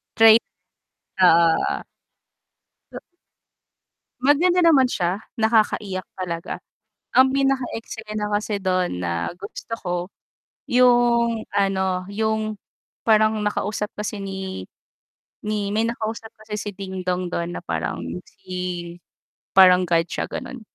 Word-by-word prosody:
Trait. 225 0 +8 0.8
Oo, - - +8
oo. 165 -1 +4 2.4
Maganda 320 +7 +3
naman 265 -6 +5
siya, 180 +1 -1 0.2
nakakaiyak 215 -4 +1 0.2
talaga. 170 -2 -4 0.6
Ang 260 +1 +6
pinaka 270 -1 +1 0.2
eksena 215 -2 -5
kasi 210 0 -1
dun 185 - 0
na 85 -1 -2
gusto 200 +3 -9
ko 180 -2 -4 0.8
yung 240 -2 +4
ano, 190 -2 0
yung 220 0 -1 0.5
parang 215 -1 +3
nakausap 210 0 -2
kasi 210 0 -4
ni 190 - -6 0.8
ni 210 -1 -1
may 225 - +2
nakausap 225 -1 -4
kasi 215 -1 -6
si 210 - -4
Dingdong 185 -2 -3
dun 170 0 -3
na - - -5
parang 80 +1 -3 0.4
si 180 -2 -5 0.6
parang 185 -2 +7
God 165 -1 +3
siya, - - -4
gano'n. 255 - -6
205 Hz, 105 wpm, -23 LUFS, 180-225 Hz, 2.4 s, Trait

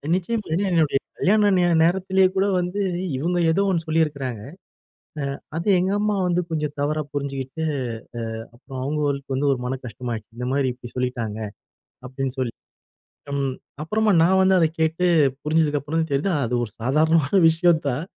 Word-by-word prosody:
நிச்சயமா. 210 +4 -2
ஏன்னா, 195 +5 +1
என்னுடைய 160 -5 +3 0.2
கல்யாண 205 +1 +3
நேர 175 -1 +3
நேரத்திலயே 190 +2 +3
கூட 190 - +2
வந்து 180 +3 -2 0.4
இவுங்க 175 +5 -1
ஏதோ 195 +5 +2
ஒண்ணு 170 -3 0
சொல்லியிருக்கிறாங்க. 140 -8 -1 1.0
அ - - -20 0.2
அது 170 +5 -3
எங்க 185 +2 0
அம்மா 210 0 +1
வந்து 180 0 +1
கொஞ்சம் 150 -2 -2
தவறா 150 +2 0
புரிஞ்சுகிட்டு, 140 +1 -4 0.8
அ - - -15
அப்புறம் 130 +1 -9
அவங்களுக்கு 140 -1 -1
வந்து 140 +1 +1
ஒரு 135 - 0
மன 130 +2 -2
கஷ்டமாயிடுச்சு. 115 -2 -6
இந்த 125 - -3
மாரி 135 -1 +1
இப்டி 125 -1 -11
சொல்லிட்டாங்க 125 -4 -2 0.7
அப்படின்னு 130 0 -4
சொல்லி. 125 -3 -1 0.8
ம். 135 -2 -1 0.3
அப்புறமா 215 +6 +1
நான் 190 +2 +4
வந்து 190 0 +4
அத 165 - +4
கேட்டு 160 +3 +1 0.4
புரிஞ்சதுக்கப்புறம் 150 0 +1
தான் 160 -2 -4
தெரியுது 145 +8 +1
அது 120 - -4
ஒரு 105 - -13
சாதாரணமான 155 - +3
விஷயம் 165 0 +3
தான். 135 +4 -2
155 Hz, 155 wpm, -23 LUFS, 135-175 Hz, 1.0 s, நான்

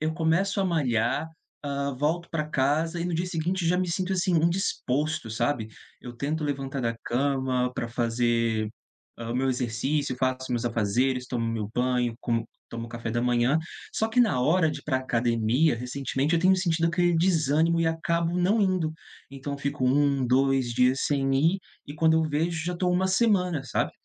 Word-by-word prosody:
eu 155 +1 -1
começo 180 +5 +1
a - - +1
malhar, 135 -4 0 0.4
hã, 140 -1 -2
volto 160 +5 0
pra 155 -2 -1
casa 155 +5 0
e - - -1
no 175 -1 -2
dia 175 +3 -1
seguinte 175 +1 -1
já 175 +2 +3
me 185 - 0
sinto 185 +2 -1
assim, 185 0 0
indisposto 155 -6 0
sabe, 115 0 -1 0.3
eu 120 - -8
tento 150 +5 -2
levantar 135 -1 -3
da 115 -2 -1
cama 130 -1 0
para - - -3
fazer, 115 -2 0 0.5
hã, 115 0 -5
o - - -2
meu 135 +1 +1
exercício, 130 +3 -1
faço 130 0 0
os - - -7
meus 120 -1 -1
afazeres, 120 +3 0
tomo 120 -2 -2
meu 110 -3 -3
banho, 125 -1 +1
como 115 -1 -1 0.2
tomo 115 0 -6
café 115 -1 -5
da 120 - 0
manhã, 125 +4 +2 0.3
só 220 - 0
que 225 +3 +2
na 205 - +3
hora 160 +4 +3
de - - -6
ir - - -25
pra 135 -4 0
a - - -1
academia 120 +3 +1
recentemente, 135 +4 -2
eu 165 - +2
tenho 185 +2 +5
sentido 170 -3 +1
aquele 175 +1 +2
desânimo 165 -1 +2
e 165 - +2
acabo 170 +1 0
não 195 +5 +2
indo, 185 -5 +1 0.4
então 140 +1 -5
fico 140 -2 -2
1, 140 0 +2
2 130 -1 +2
dias 125 +2 +3
sem 135 -2 +1
ir 165 +8 +3 0.3
e 145 - -8
quando 160 +1 +3
eu 160 - +3
vejo, 160 +2 -1
já 180 - -1
estou 180 +1 0
uma 185 +1 +2
semana, 185 - +2
sabe. 125 - -1
140 Hz, 190 wpm, -26 LUFS, 125-170 Hz, 0.5 s, tenho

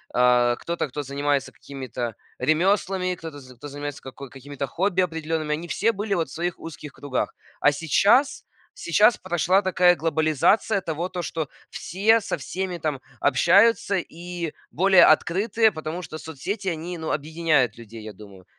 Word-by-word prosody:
э, 125 -1 +4
кто-то, 170 -2 -3
кто 145 +3 -5
занимается 140 0 -1
какими-то 125 -4 -6 0.2
ремёслами, 185 +2 +1
кто-то, 160 -4 -9
з 130 -1 -14
кто 145 +5 -10
занимается 145 0 -6
како 130 0 -10
какими-то 140 +1 -6
хобби 185 +4 0
определёнными. 160 -2 -2
Они 165 +3 -4
все 225 +7 +1
были 205 0 -3
вот 165 -2 -1
в - - -14
своих 175 +1 -3
узких 150 -2 -9
кругах. 145 -3 -3 0.2
А 145 - +4
сейчас 205 - +2 0.3
сейчас 240 - +4
прошла 185 +2 +1
такая 180 -2 +4
глобализация 160 +6 +1
того, 165 +2 -3
то, 180 -1 -5
что 160 -3 -3 0.2
все 215 +6 +2
со 200 - -3
всеми 180 +5 -4
там 150 -4 -3 0.2
общаются 195 - +4 0.2
и 170 -1 -5 0.2
более 190 +2 +6
открытые, 210 +8 +3
потому 160 +2 -5
что 155 -1 -8
соцсети, 190 - -5
они, 170 +1 -3
ну, 160 - -4
объединяют 155 -6 0
людей, 115 -1 -11
я 110 - -7
думаю. 100 -2 -14
160 Hz, 155 wpm, -24 LUFS, 145-185 Hz, 0.3 s, более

